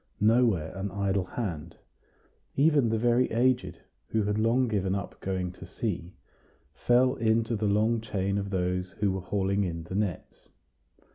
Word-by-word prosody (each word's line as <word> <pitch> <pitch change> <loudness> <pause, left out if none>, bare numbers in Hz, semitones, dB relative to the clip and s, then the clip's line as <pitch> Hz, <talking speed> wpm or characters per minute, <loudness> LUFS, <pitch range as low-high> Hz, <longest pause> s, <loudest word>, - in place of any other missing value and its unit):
Nowhere 110 -7 +2
an 100 +1 -3
idle 100 -1 -1
hand; 90 -7 -5 0.8
even 145 -4 +4
the 110 - +1
very 120 +2 +2
aged, 115 -7 +1 0.3
who 110 -1 0
had 105 +1 0
long 120 +3 +2
given 95 -4 0
up 100 - -6
going 95 -2 -2
to 90 - -11
sea, 90 -6 -4 0.6
fell 125 - +3
into 115 +1 +1
the 105 0 -1
long 110 +3 +2
chain 100 -2 -1
of 100 0 -4
those 90 -1 -1
who 100 -1 0
were 95 0 -3
hauling 100 +1 0
in 85 -3 -3
the 85 - -8
nets. 100 -3 -3
100 Hz, 155 wpm, -28 LUFS, 95-115 Hz, 0.8 s, even